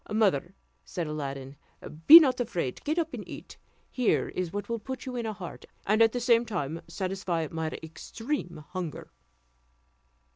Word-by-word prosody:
"Mother," 195 -4 +1 0.3
said 175 -3 -4
Aladdin, 140 -2 -5 0.5
"be 325 +3 +14
not 270 -6 +2
afraid: 175 - -2
get 310 +3 -1
up 325 -2 -1
and - - -5
eat; - - -9 0.3
here 250 -3 +1
is 180 -2 -3
what 205 +2 -4
will 230 -1 -2
put 260 +4 -6
you 255 -1 -5
in 235 -2 -2
heart, 195 -5 -7 0.2
and 215 +3 +3
at 225 -1 +6
the 245 - -2
same 235 -1 +4
time 165 -8 -3
satisfy 185 -4 -2
my 160 -1 -2 0.2
extreme 175 - -5
hunger." 180 -4 -6
195 Hz, 155 wpm, -28 LUFS, 165-235 Hz, 0.5 s, be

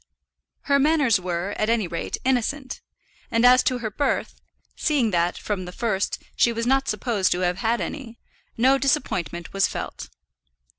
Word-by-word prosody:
Her 280 -1 +2
manners 285 -7 +3
were, 180 +2 -3
at 215 - +1
any 230 -5 +1
rate, 170 0 -4
innocent; 260 +2 -1 0.5
and 230 +1 +2
as 250 +1 +7
to 255 - 0
her 225 -3 -4
birth, 285 +7 -2 0.3
seeing 275 -8 +1
that, 175 0 +1
from 195 -3 -3
the 180 - -7
first, 205 -1 -1 0.2
she 235 - +3
was 230 0 -3
not 270 +2 +2
supposed 215 -2 0
to 180 - -3
have 180 0 0
had 230 +3 +1
any, 240 -5 -6 0.4
no 265 +4 +4
disappointment 180 - -1
was 195 0 +3
felt. - - -6
230 Hz, 160 wpm, -24 LUFS, 190-265 Hz, 0.5 s, as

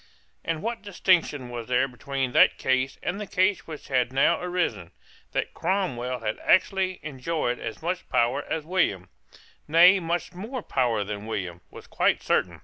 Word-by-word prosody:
And 165 +2 -3
what 235 +1 -3
distinction 170 -9 +1
was 120 -2 -6
there 125 +1 +2
between 135 0 -3
that - - +5
case 130 +1 0
and 200 +3 -2
the 210 - -5
case 185 +1 +1
which 155 -2 -8
had 125 -2 +1
now 135 +1 +3
arisen? 175 - -2 0.4
That - - -2
Cromwell 125 - -1
had 110 -1 -3
actually 185 0 +2
enjoyed 145 -3 -2
as 115 - -6
much 180 +2 -3
power 120 +5 +1
as 160 -2 -2
William, 160 - 0 0.6
nay 175 +5 +7
much 170 0 -2
more 220 +6 -6
power 120 -5 0
than 105 +1 -6
William, 90 -6 -4
was - - -12
quite - - +1
certain. - - 0
145 Hz, 160 wpm, -26 LUFS, 120-180 Hz, 0.6 s, nay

